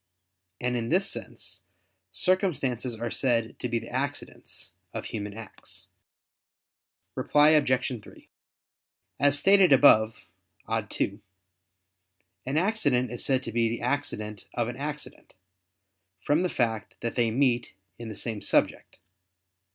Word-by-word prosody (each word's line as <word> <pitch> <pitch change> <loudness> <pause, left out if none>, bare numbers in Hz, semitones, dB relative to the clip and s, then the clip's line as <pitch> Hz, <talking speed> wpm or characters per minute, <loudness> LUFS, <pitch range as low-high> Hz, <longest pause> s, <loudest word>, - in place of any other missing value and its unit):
And 125 0 -1
in 115 -1 -2
this 190 +6 +2
sense - - -7 0.5
circumstances 130 - 0
are 115 +1 -4
said 115 -4 0
to 125 - -3
be 120 - 0
the - - -6
accidents 140 +3 -4 0.2
of - - -4
human 105 -2 -5
acts. 110 -2 -9 1.3
Reply 150 +1 +4
Obj. 130 -5 +2
3: - - -16 0.9
As 145 +1 +5
stated 195 +3 +5
above 115 -5 +6 0.5
(ad - - -1
2), 100 +2 -1 1.3
an 135 +3 0
accident 145 - +1
is 120 - -2
said 130 -1 +1
to 115 - -4
be 115 0 +2
the 115 +1 -4
accident 110 -6 -2
of 120 -2 0
an 120 - -5
accident, 150 +2 -6 0.8
from 150 +3 +1
the 180 - +1
fact 115 -7 -1
that 115 - -2
they 120 -2 +2
meet 120 -2 +1 0.2
in 115 -1 -6
the 110 - -7
same 110 -2 -3
subject. - - 0
125 Hz, 130 wpm, -27 LUFS, 115-145 Hz, 1.3 s, above